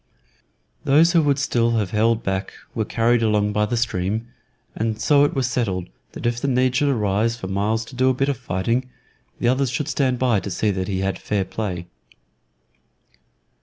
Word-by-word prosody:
Those 155 Hz, +5 st, +5 dB
who 170 Hz, -, +5 dB
would 145 Hz, -2 st, +2 dB
still 120 Hz, -4 st, +1 dB
have 105 Hz, -4 st, -1 dB
held 115 Hz, +1 st, +2 dB
back 95 Hz, +1 st, -2 dB, 0.2 s
were 110 Hz, -3 st, -1 dB
carried 115 Hz, +2 st, +2 dB
along 105 Hz, -2 st, +1 dB
by 105 Hz, 0 st, +1 dB
the 120 Hz, -, -1 dB
stream, 110 Hz, 0 st, -1 dB, 0.5 s
and 110 Hz, 0 st, -2 dB
so 140 Hz, +5 st, +4 dB
it 145 Hz, -, -2 dB
was 135 Hz, -2 st, +1 dB
settled 100 Hz, -, -2 dB, 0.2 s
that -, -, -7 dB
if 120 Hz, 0 st, 0 dB
the -, -, -1 dB
need 130 Hz, -1 st, +2 dB
should 145 Hz, -, +2 dB
arise 110 Hz, -1 st, +1 dB
for 115 Hz, -, -7 dB
Myles 105 Hz, +4 st, -1 dB
to 130 Hz, -, -12 dB
do 130 Hz, +1 st, +3 dB
a -, -, +3 dB
bit 135 Hz, +2 st, 0 dB
of 140 Hz, -, 0 dB
fighting, 120 Hz, +3 st, -1 dB, 0.5 s
the -, -, 0 dB
others 130 Hz, +1 st, +2 dB
should 125 Hz, +4 st, -2 dB
stand 130 Hz, -3 st, +1 dB
by 120 Hz, -4 st, +2 dB
to 100 Hz, -, -6 dB
see 105 Hz, +3 st, 0 dB
that 95 Hz, -1 st, -3 dB
he 95 Hz, -2 st, -2 dB
had 95 Hz, 0 st, -2 dB
fair 100 Hz, -2 st, -1 dB
play. 95 Hz, -6 st, -4 dB
115 Hz, 195 wpm, -22 LUFS, 105-130 Hz, 0.5 s, Those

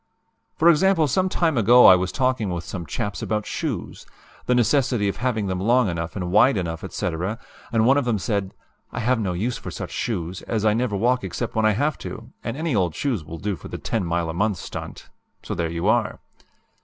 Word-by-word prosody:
"For 165 Hz, -, +3 dB
example, 170 Hz, -1 st, +3 dB
some 185 Hz, +8 st, +1 dB
time 160 Hz, -8 st, +1 dB
ago 120 Hz, +3 st, +7 dB
I 95 Hz, -, +10 dB
was 90 Hz, 0 st, -1 dB
talking 130 Hz, -5 st, 0 dB
with 85 Hz, -1 st, -3 dB
some 85 Hz, -3 st, -6 dB
chaps 100 Hz, -3 st, -3 dB
about 105 Hz, -1 st, -2 dB
shoes -, -, -4 dB, 0.4 s
the 125 Hz, -, +3 dB
necessity 125 Hz, -2 st, +2 dB
of 100 Hz, -, -2 dB
having 120 Hz, -4 st, -1 dB
them 95 Hz, -1 st, -2 dB
long 120 Hz, +4 st, +3 dB
enough 85 Hz, -1 st, -4 dB
and 90 Hz, -3 st, -3 dB
wide 125 Hz, +5 st, +5 dB
enough, 80 Hz, -3 st, -3 dB
etc., 90 Hz, +6 st, -3 dB, 0.3 s
and 115 Hz, -1 st, +3 dB
one 135 Hz, +3 st, +5 dB
of 140 Hz, -, -2 dB
them 120 Hz, -3 st, +1 dB
said: 100 Hz, -1 st, -2 dB, 0.4 s
'I -, -, -4 dB
have 125 Hz, +1 st, +2 dB
no 95 Hz, -5 st, -1 dB
use 115 Hz, +8 st, -2 dB
for -, -, -7 dB
such -, -, -6 dB
shoes, 90 Hz, -5 st, -3 dB
as 110 Hz, -2 st, -1 dB
I 105 Hz, -, +4 dB
never 115 Hz, -2 st, 0 dB
walk 125 Hz, +5 st, +1 dB
except 120 Hz, -, -4 dB
when 110 Hz, -1 st, +2 dB
I 110 Hz, -, +3 dB
have 145 Hz, +7 st, 0 dB
to, -, -, -8 dB
and 115 Hz, +3 st, -4 dB
any 160 Hz, -4 st, -1 dB
old 90 Hz, -5 st, +1 dB
shoes 130 Hz, -, -1 dB
do 85 Hz, +6 st, -4 dB
for 80 Hz, -, -11 dB
the -, -, -6 dB
10 110 Hz, -4 st, -2 dB
mile 85 Hz, -1 st, -1 dB
a 80 Hz, -, -3 dB
month 100 Hz, +3 st, 0 dB
stunt,' -, -, -8 dB, 0.4 s
so -, -, -4 dB
there 85 Hz, -1 st, -1 dB
you 85 Hz, +3 st, -2 dB
are! 110 Hz, 0 st, +2 dB
110 Hz, 215 wpm, -23 LUFS, 90-125 Hz, 0.4 s, I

